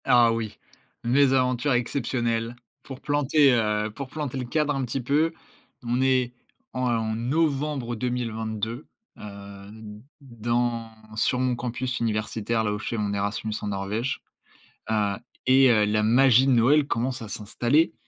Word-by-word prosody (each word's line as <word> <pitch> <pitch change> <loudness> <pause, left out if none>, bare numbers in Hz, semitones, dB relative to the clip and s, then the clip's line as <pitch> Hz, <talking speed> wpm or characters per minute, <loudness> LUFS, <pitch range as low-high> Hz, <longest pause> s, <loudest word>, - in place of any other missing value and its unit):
Ah 120 -1 +5
oui, 115 -2 -4 0.5
mes 130 +3 +4
aventures 125 +1 +2
exceptionnelles. 120 -2 -1 0.3
Pour 135 -1 -9
planter, 145 -1 +3
heu, 105 -2 +1
pour 140 0 -5
planter 145 -2 -4
le 125 - -3
cadre 150 +4 0
un 135 - -1
petit 125 +2 -3
peu, 150 +6 +2 0.5
on 120 +2 0
est 130 -2 +2 0.4
en 115 -3 0
novembre 140 0 -1
2022, 115 0 -3 0.3
heu, 100 -1 -10 0.5
dans 120 -2 -2 0.3
sur 120 +3 +1
mon 130 -1 +1
campus 125 +1 -3
universitaire, 110 0 -1
là 105 -1 0
où 105 - -3
je 110 - -7
fais 115 - -2
mon 105 -1 -1
Erasmus 100 +2 -2
en - - -4
Norvège. 105 +5 -2 0.7
Heu 105 -2 +1 0.3
et 130 0 +6
heu, 105 -2 +4
la 105 +1 +1
magie 125 +3 +5
de 135 - +3
Noël 130 +5 +4
commence 125 0 -2
à - - -7
s'installer. 120 +10 +1
120 Hz, 145 wpm, -25 LUFS, 110-130 Hz, 0.7 s, et